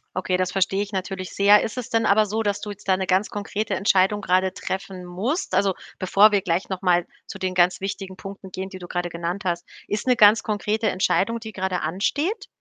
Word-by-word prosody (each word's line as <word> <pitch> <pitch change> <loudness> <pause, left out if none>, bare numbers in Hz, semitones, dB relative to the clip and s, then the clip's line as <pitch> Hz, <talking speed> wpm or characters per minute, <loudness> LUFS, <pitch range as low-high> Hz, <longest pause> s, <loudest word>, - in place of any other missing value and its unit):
Okay, 185 0 0
das 185 0 -1
verstehe 195 +1 +1
ich 205 0 -4
natürlich 185 -1 -4
sehr. 205 +1 +6
Ist 225 - -5
es 250 - -4
denn 225 -1 +1
aber 215 +1 +4
so, 215 +2 -2
dass 205 -1 0
du 210 - -5
jetzt 205 0 -12
da 190 -1 +3
‘ne 190 - -2
ganz 190 +3 +2
konkrete 205 +1 -3
Entscheidung 195 +1 +2
grade 185 0 +2
treffen 190 -1 -5
musst? 205 - -3
Also, 195 +1 +3 0.3
bevor 200 +3 +5
wir 205 -1 +2
gleich 180 -1 -1
noch 190 -2 -4
mal 175 -2 +3 0.2
zu - - -7
den 185 -1 -2
ganz 180 0 +3
wichtigen 195 -1 -5
Punkten 195 -1 -9
gehen, 190 +1 -5
die 190 -1 -9
du 175 - -9
grade 175 0 -2
genannt 170 +4 -4
hast, 175 -1 -1 0.2
ist 210 +4 -3
‘ne 250 - +5
ganz 215 -1 +6
konkrete 215 +1 -1
Entscheidung, 200 +4 +1
die 220 -1 -8
grade 185 -2 -2
ansteht? 290 - -1
195 Hz, 225 wpm, -23 LUFS, 185-210 Hz, 0.3 s, sehr